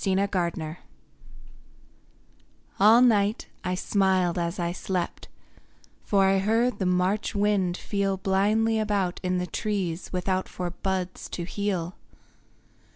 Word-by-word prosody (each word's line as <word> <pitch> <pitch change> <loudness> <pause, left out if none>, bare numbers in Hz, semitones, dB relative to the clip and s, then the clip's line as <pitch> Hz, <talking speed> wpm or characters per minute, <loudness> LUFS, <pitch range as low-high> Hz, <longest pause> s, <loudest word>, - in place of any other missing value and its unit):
INTIMATION 180 -5 -1 2.0
All 220 +5 +7
night 210 -3 +2
I 180 0 -1
smiled 185 -2 +1
as 170 +3 -2
I 170 -2 -1
slept, 180 0 -3 0.8
For 195 -2 +3
I 195 0 +3
heard 225 +5 +1
the 190 - 0
March 185 +4 0
wind 200 -3 +1
feel 200 -1 -1
Blindly 210 +4 +2
about 200 -4 0
in 185 0 0
the 180 - -1
trees 185 -2 -3
without 185 +1 -1
For 180 -1 -4
buds 185 0 -3
to 175 - -4
heal. 185 -2 -3
190 Hz, 115 wpm, -26 LUFS, 180-205 Hz, 2.0 s, All